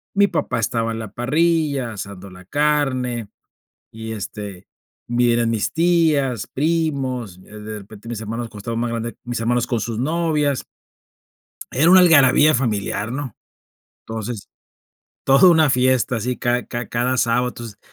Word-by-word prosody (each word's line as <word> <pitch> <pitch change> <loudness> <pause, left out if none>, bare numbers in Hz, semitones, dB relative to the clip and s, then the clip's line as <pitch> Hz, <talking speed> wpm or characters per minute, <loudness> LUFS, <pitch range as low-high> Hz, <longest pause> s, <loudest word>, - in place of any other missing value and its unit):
mi 200 0 +5
papá - - -2
estaba 115 -2 -1
en 115 - -5
la 110 -2 -7
parrilla, 145 -2 0
asando 100 -1 -8
la 90 0 -14
carne, 130 -4 0 0.6
y 110 0 -7
este, 100 -2 -7 0.4
vi 120 0 +2
eran 115 -1 +1
mis 110 -3 -1
tías, 160 - +2
primos, 135 - -1
eh, - - -17 0.2
de 105 0 -7
repente 105 +2 -13
mis 115 -2 -5
hermanos, 115 +2 -4
como 105 - -11
estaban 115 +3 -4
más 120 -1 -1
grandes, 115 0 -4
mis 120 -1 -3
hermanos 120 +1 +1
con 120 -3 -1
sus 115 -1 -3
novias. 150 -1 0 1.1
Era 155 +6 +3
una 190 - +9
algarabía 155 -2 +6
familiar, 110 -3 -1
¿no? 130 -3 -5 0.7
Entonces, 110 -1 -5 0.8
toda 135 +7 +6
una 160 -4 +4
fiesta 125 -2 +2
sí 125 +3 -2
cada 120 0 -1
cada 120 -1 -4
cada 125 +2 0
sábado, 125 +1 +2
entonces 115 -4 -9
120 Hz, 150 wpm, -21 LUFS, 115-140 Hz, 1.1 s, una